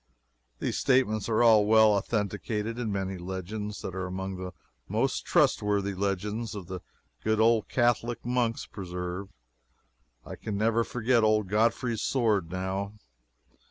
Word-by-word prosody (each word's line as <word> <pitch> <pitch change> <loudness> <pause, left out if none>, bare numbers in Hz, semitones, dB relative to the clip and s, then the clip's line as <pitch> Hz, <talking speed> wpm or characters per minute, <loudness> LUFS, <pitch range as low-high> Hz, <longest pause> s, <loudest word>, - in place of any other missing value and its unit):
These - - -2
statements 115 -5 +2
are 110 +1 +3
all 110 -3 +6
well 110 0 +6
authenticated 105 +2 -2
in 115 -3 -2
many 95 -1 -3
legends 100 +3 -5
that 95 - -4
are 95 0 -3
among 95 +1 -4
the 90 0 -6 0.4
most 115 +6 0
trustworthy 105 - +2
legends 100 +3 -2
the 95 -2 -6 0.4
good 110 0 +1
old 115 -1 +3
Catholic 120 -1 +1
monks 120 -2 0
preserve. 90 0 -5 1.0
I - - -8
can 105 -2 -4
never 115 +2 +2
forget 120 0 +1
old 110 -3 +2
Godfrey's 115 +2 +1
sword, 110 -9 +1
now. 95 +3 -3
105 Hz, 130 wpm, -28 LUFS, 95-115 Hz, 1.0 s, all